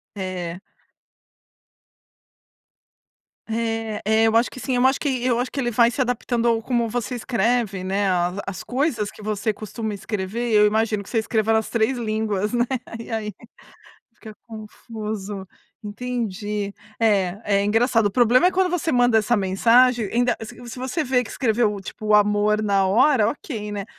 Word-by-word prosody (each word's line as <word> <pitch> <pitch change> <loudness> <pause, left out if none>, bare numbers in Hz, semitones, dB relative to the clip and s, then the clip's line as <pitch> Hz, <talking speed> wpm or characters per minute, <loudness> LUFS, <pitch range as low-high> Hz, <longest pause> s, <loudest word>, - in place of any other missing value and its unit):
É. 185 -2 -5 2.9
É 225 -1 -2
é 220 +1 +3
eu 225 - +1
acho 235 +2 +3
que 255 - -10
sim, 250 +2 -2
eu 245 +1 +3
acho 265 +1 +3
que 260 -4 -1
eu 245 -2 +2
acho 250 - -2
que 280 - -4
ele 240 -2 0
vai 235 +1 +4
se 250 - -7
adaptando 240 -1 0
ao 230 -1 +2
como 235 -1 0
você 240 +1 -3
escreve, 230 -4 0
né, 195 +2 0
a 180 -1 +1
as 195 +1 -5
coisas 250 -5 -1
que - - -14
você 215 +1 -1
costuma 215 +1 -5
escrever, 215 +3 -3
eu 210 0 +6
imagino 215 0 +1
que - - -14
você 230 - -1
escreva 220 0 0
nas 220 -1 +1
3 230 +3 +1
línguas, 215 -2 -1
né. 240 0 +2 0.3
E 230 - -9
aí 215 -2 -3 0.8
fica 215 -1 -12
confuso, 215 -3 -7 0.4
entendi. 210 -2 -4 0.3
É 200 -4 +2 0.2
é 200 - +1
engraçado. 225 +1 +2
O - - +1
problema 245 - +4
é - - +4
quando 370 -1 +1
você 355 -2 -1
manda 245 -2 +4
essa 230 +3 +1
mensagem, 230 +4 +3
ainda 245 +1 +2
se 220 - -8
se 235 - -8
você 260 +6 -2
vê 250 -1 +1
que - - -10
escreveu, 220 -4 0
tipo, 215 +2 -8
o 210 - +4
amor 210 +1 +3
na 200 -2 +2
hora, 220 +3 +4
ok, 220 -5 -5
né. 200 -1 -4
220 Hz, 170 wpm, -22 LUFS, 205-245 Hz, 2.9 s, eu